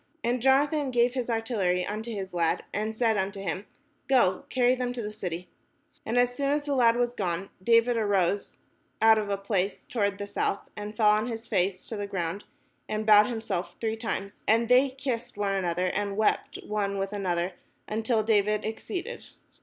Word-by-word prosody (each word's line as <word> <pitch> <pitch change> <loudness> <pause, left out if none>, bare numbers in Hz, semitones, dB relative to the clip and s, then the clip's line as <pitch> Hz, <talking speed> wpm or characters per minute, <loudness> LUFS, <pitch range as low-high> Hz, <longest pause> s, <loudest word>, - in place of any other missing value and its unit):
And 240 +1 0
Jonathan 280 +2 +3
gave 240 0 +2
his 250 -2 -3
artillery 210 -6 0
unto 215 +3 -4
his 195 -4 -5
lad, 170 -2 +1
and 215 +2 -2
said 225 -2 +2
unto 195 +1 -2
him, 195 +1 -4 0.4
"Go, 245 -9 +3
carry 250 -1 +3
them 250 -1 -2
to 245 - -4
the 210 0 -5
city." 180 -4 -5 0.6
And 230 +2 0
as 245 0 +3
soon 275 +2 -1
as 290 0 0
the 290 - -1
lad 235 -3 +4
was 240 0 0
gone, 190 -3 -3
David 230 +3 +4
arose 200 -2 0 0.4
out 220 0 +6
of 210 -1 -3
a 200 - 0
place 195 -1 -2
toward 200 -4 -1
the 205 - -4
south, 200 0 -2
and 210 0 -7
fell 210 -2 +5
on 215 +2 +1
his 230 -1 -5
face 185 -2 0
to 220 - -6
the 205 0 -3
ground, 185 0 -3 0.4
and 215 0 -2
bowed 210 -1 +7
himself 220 -7 -3
three 220 -1 -1
times: 220 -3 -5
and 230 +2 +3
they 255 +2 +6
kissed 255 -5 -4
one 200 -1 0
another, 180 -2 0
and 200 +2 -1
wept 215 - +1
one 200 -2 -1
with 195 +1 -2
another, 180 -3 -1 0.4
until 220 +1 0
David 210 -1 +2
exceeded. 360 - -5
215 Hz, 185 wpm, -28 LUFS, 195-240 Hz, 0.6 s, bowed